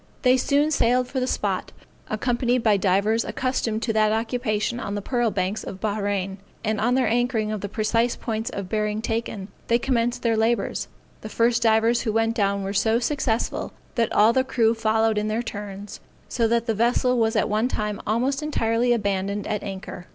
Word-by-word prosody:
They 255 0 +5
soon 285 +4 +2
sailed 250 -3 +2
for 260 - -3
the 255 - -1
spot, - - -2 0.4
accompanied 240 +2 0
by 215 -2 +4
divers 200 +4 +2
accustomed 240 -4 -2
to 225 - 0
that 215 -1 +3
occupation 225 0 -1
on 200 -4 -4
the 205 - -3
pearl 240 -1 +1
banks 195 +1 -2
of 190 - -7
Bahrain; 200 -2 -2 0.2
and, 215 -2 -1
on 240 +3 +2
their 260 -3 +2
anchoring 230 -1 0
at 215 -2 -3
the 200 - -4
precise 230 +3 +1
points 225 +1 -3
of 200 -5 -5
bearing 210 +1 -1
taken, 225 -4 -3 0.2
they 235 - +4
commenced 240 -1 0
their 230 -1 +2
labors. 225 +2 0 0.3
The 215 - -7
first 235 +2 +2
divers 225 +1 +3
who 225 - -1
went 225 0 +2
down 200 -3 0
were 195 +1 -3
so 220 +3 +2
successful, 245 -2 -1 0.2
that 230 -2 0
all 220 +2 +5
the 260 - +3
crew 230 -3 +2
followed 220 -1 +1
in 210 - -2
their 220 +2 -1
turns, 205 -2 -7 0.3
so 230 -2 +1
that 235 0 +1
the 225 - 0
vessel 240 +3 +2
was 225 0 +1
at 210 - +2
one 215 +3 +1
time 210 -4 -3
almost 255 +6 0
entirely 240 -5 +1
abandoned 200 -2 -1
at 210 -2 -2
anchor. 190 -2 -7
225 Hz, 190 wpm, -24 LUFS, 210-240 Hz, 0.4 s, They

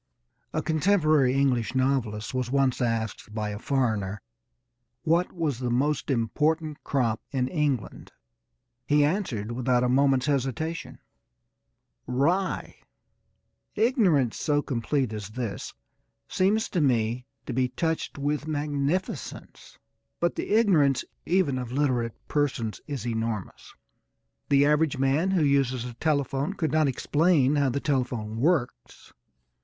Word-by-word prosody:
A - - -2
contemporary 155 -5 +3
English 130 -4 +1
novelist 130 -4 0
was 130 -1 -1
once 135 -1 +1
asked 110 -2 -2
by 105 -1 -2
a 105 0 -5
foreigner 110 -8 -1 0.8
what 170 +2 +2
was 155 -8 -2
the 125 -1 -2
most 135 +4 0
important 150 +5 0
crop 120 -6 0
in 130 -3 -1
England. 145 - -2 0.8
He 145 0 +4
answered 140 - -2
without 125 0 +1
a 125 - +2
moment's 135 0 +3
hesitation: 145 +3 -2 1.1
"Rye." 165 +10 0 1.0
Ignorance 190 - +2
so 145 -2 +1
complete 130 -1 -1
as 105 -2 -6
this 115 -2 -5 0.5
seems 210 +4 +1
to 175 - 0
me 120 -2 +1 0.2
to - - -4
be 130 +1 +1
touched 160 +5 -2
with 145 +2 -2
magnificence; 145 +3 -3 0.4
but 175 0 +1
the - - -4
ignorance 175 - +3 0.2
even 165 -8 +2
of 125 -2 -5
illiterate 125 -4 0
persons 135 -7 -1
is 140 -4 -4
enormous. 115 -4 -4 0.7
The 140 0 +5
average 150 0 +2
man 135 +7 +2
who 185 -4 +2
uses 135 -4 +1
a 125 - -6
telephone 140 +3 -1
could 160 -5 -1
not 155 -1 +3
explain 145 +1 +2
how 140 -1 +3
a 130 +2 -1
telephone 125 -6 -2
works. 125 - -1
135 Hz, 125 wpm, -26 LUFS, 125-155 Hz, 1.1 s, The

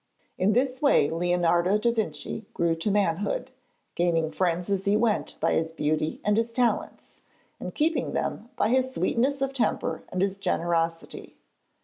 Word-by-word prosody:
In 195 +3 +2
this 255 +2 0
way 280 - +4
Leonardo 175 +2 +2
da 235 +2 +2
Vinci 215 -1 -4
grew 170 -1 +2
to 165 +6 -2
manhood, 205 +5 0 0.4
gaining 165 -2 +1
friends 175 -1 0
as 195 -1 -1
he 200 +1 +3
went 220 -1 0
by - - +1
his 160 0 0
beauty 155 0 -1
and 210 0 +3
his 230 +1 0
talents, 240 0 -2 0.4
and - - -6
keeping 310 -3 0
them 230 - -3
by 210 - +1
his 260 +1 +2
sweetness 270 +3 +1
of 270 0 -2
temper 245 -5 -1
and 185 +1 -1
his 195 0 -1
generosity. 165 -2 -2
200 Hz, 155 wpm, -26 LUFS, 170-235 Hz, 0.4 s, way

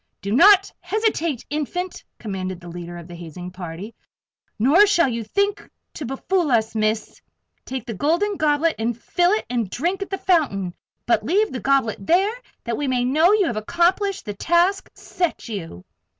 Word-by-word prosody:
"Do 200 - -5
not 390 - +6
hesitate, 355 - -1
Infant!" 350 +5 -3
commanded 185 -4 -5
the 175 -1 -11
leader 175 0 -7
of 170 -1 -10
the 175 - -10
hazing 175 +1 -8
party. 180 +4 -7 0.6
"Nor 295 - +5
shall 345 -6 +4
you 230 -2 -2
think 400 - -1 0.2
to 285 - -6
befool 330 +6 0
us, 220 -2 +2
Miss! 215 0 -1 0.4
Take 260 -3 -5
the 230 - -5
Golden 340 - +1
Goblet, 310 0 +2
and 230 +1 -1
fill 355 - +2
and 235 -5 -1
drink 350 - -2
at 395 - -4
the 390 - -2
fountain. 240 - +1 0.3
But 230 -2 +2
leave 405 - +2
the 255 - -4
goblet 270 -3 +1
there, 380 - +3 0.3
that 235 -2 -2
we 290 - -2
may 250 -1 +1
know 310 +8 +4
you 420 -3 +3
have 235 -8 -2
accomplished 360 - +1
the 205 - -4
task 345 - +1
set 350 -6 -3
you!" 165 - -7
270 Hz, 170 wpm, -22 LUFS, 215-360 Hz, 0.6 s, not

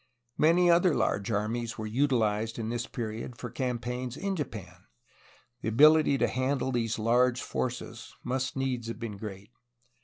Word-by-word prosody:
Many 170 +3 +5
other 170 -1 +4
large 100 +3 0
armies 115 +2 -2
were 110 - -4
utilized 115 -3 +1
in 110 -1 -3
this 120 +2 -3
period 115 0 -5
for - - -6
campaigns 125 -1 -3
in 195 0 -2
Japan. 95 - -7 0.7
The - - -1
ability 150 +4 +6
to - - +2
handle 130 +1 -1
these 115 -2 -1
large 120 +2 +3
forces 120 -2 -4
must 130 +1 -2
needs 130 -3 -2
have 115 - -5
been 115 -3 -6
great. 100 0 -8
120 Hz, 150 wpm, -29 LUFS, 110-130 Hz, 0.7 s, ability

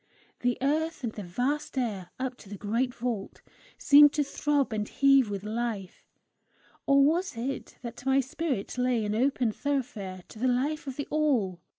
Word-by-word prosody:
The 245 0 0
earth 315 +2 0
and 230 -2 -2
the 210 - -6
vast 250 +11 -2
air, 205 -8 -2
up 255 -1 -3
to 200 - -15
the 205 - -7
great 230 +6 0
vault, 235 -5 -4 0.3
seemed 290 0 +7
to 295 - +2
throb 285 -2 0
and 210 -1 -2
heave 275 -4 +4
with 200 -1 -4
life 215 -3 -4 0.8
or 275 0 +6
was 335 -2 0
it 260 +4 -4
that 235 -1 -7
my 270 +1 +3
spirit 265 -4 -3
lay 250 -3 +1
an 210 - -1
open 250 0 +1
thoroughfare 210 -9 -3
to 220 - -12
the 255 - +1
life 280 +5 0
of 265 - -4
the 285 - -3
All? 255 - +1
250 Hz, 175 wpm, -28 LUFS, 215-280 Hz, 0.8 s, seemed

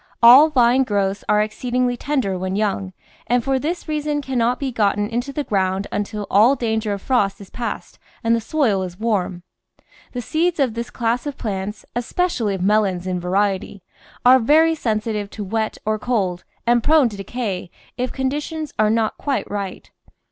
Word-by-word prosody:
All 260 +7 +9
vine 255 -2 +4
growths 200 -3 -1
are 210 0 +4
exceedingly 245 +3 -1
tender 255 -7 -1
when 185 +1 -3
young, 200 -2 -1 0.4
and 245 0 +2
for 270 +1 +1
this 335 +6 -3
reason 300 -1 -1
cannot 250 -3 0
be 275 -2 -2
gotten 205 -2 +1
into 240 +4 -3
the 290 +2 -2
ground 190 -3 0
un 205 - 0
til 210 0 -6
all 225 +7 +5
danger 220 -3 -1
of 200 - -6
frost 205 -7 +1
is 200 -2 -12
past 240 -1 -5 0.2
and 230 0 +3
the 230 - -1
soil 225 -7 +1
is 180 0 -6
warm. 190 -6 -1 0.7
The 250 - -3
seeds 330 +5 0
of 260 -5 +2
this 235 +1 -4
class 240 +3 -1
of 285 - -5
plants 205 -1 -4
— - - -49
especially 240 - -1
of 185 - -4
melons 195 -3 +2
in 185 -1 -2
variety 195 +1 -1 0.2
— - - -26
are 255 +1 +8
very 315 +7 +4
sensitive 215 -6 -2
to 210 - -6
wet 220 +2 -2
or 215 0 0
cold 195 -7 -1 0.2
and 240 -1 +3
prone 305 -4 +5
to 205 - -9
decay 195 -3 -4 0.3
if 250 0 -2
conditions 295 +3 -3
are 215 0 +4
not 220 0 0
quite 280 -2 -1
right. 200 -2 -5
225 Hz, 185 wpm, -21 LUFS, 200-260 Hz, 0.7 s, All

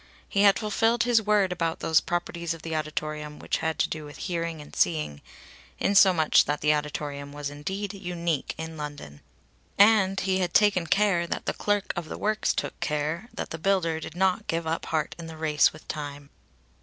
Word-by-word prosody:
He 200 - +1
had 200 -1 +6
fulfilled 225 +2 +1
his 235 -2 +3
word 210 -3 +2
about 165 -2 -1
those 160 -1 +3
properties 170 -1 -3
of 160 - -14
the 165 -1 -3
auditorium 155 -1 -4
which - - -2
had 160 0 -2
to - - +2
do 155 -1 -5
with 145 0 -10
hearing 170 -3 -3
and 150 - -12
seeing 150 - 0 0.6
in 200 - +1
so 195 -1 +8
much 160 -4 +4
that 150 0 -2
the 150 0 +4
auditorium 145 -1 -4
was 145 0 -5
indeed 190 +8 -4
unique 170 -6 -3
in 160 0 -6
London. 145 - -7 0.6
And 200 -2 +5
he 190 -1 0
had 180 -2 -1
taken 200 -5 +4
care 190 -4 +2
that - - -4
the - - 0
clerk 205 -1 -1
of 170 -3 -5
the - - -5
Works 215 0 +1
took - - -3
care 155 +8 -2
that - - -6
the 160 - -5
builder 170 -3 +1
did 160 - -8
not 190 +3 +1
give 165 0 -1
up 160 +1 -2
heart 155 -2 -1
in 165 - -7
the 160 -1 -9
race 155 -2 +3
with 155 - -15
time. 145 -2 -6
165 Hz, 200 wpm, -26 LUFS, 150-195 Hz, 0.6 s, so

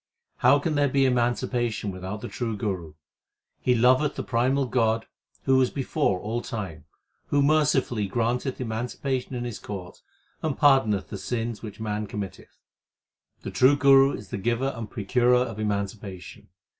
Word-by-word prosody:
How 130 +4 +5
can 155 +2 -1
there 145 -1 +2
be 135 +1 +3
emancipation 120 -3 0
without 95 +3 -6
the - - -5
true 115 -3 -3
Guru? 90 -7 -4 0.6
He 125 - +2
loveth 130 +5 +3
the - - -3
primal 130 +3 +1
God 115 -2 +1 0.4
who 135 -1 +4
was 130 -1 +3
before 135 -7 0
all 115 +4 -3
time, 95 -11 -6 0.4
Who 145 -1 +2
mercifully 140 -8 +2
granteth 120 +5 -1
emancipation 125 +3 -3
in 120 - -3
His 120 -3 -5
court, 95 -3 -8 0.4
and 155 -4 -2
pardoneth 120 -9 +3
the 100 - -6
sins 115 -2 -3
which 110 -2 -8
man 105 -1 -3
committeth. 100 -2 -7 0.9
The - - -5
true 130 +3 +5
Guru 135 -1 +6
is 100 -2 -8
the 100 - -4
giver 120 +6 0
and 115 -3 -6
procurer 120 +3 +2
of 120 -4 0
emancipation. 100 -3 -4
120 Hz, 155 wpm, -26 LUFS, 105-130 Hz, 0.9 s, Guru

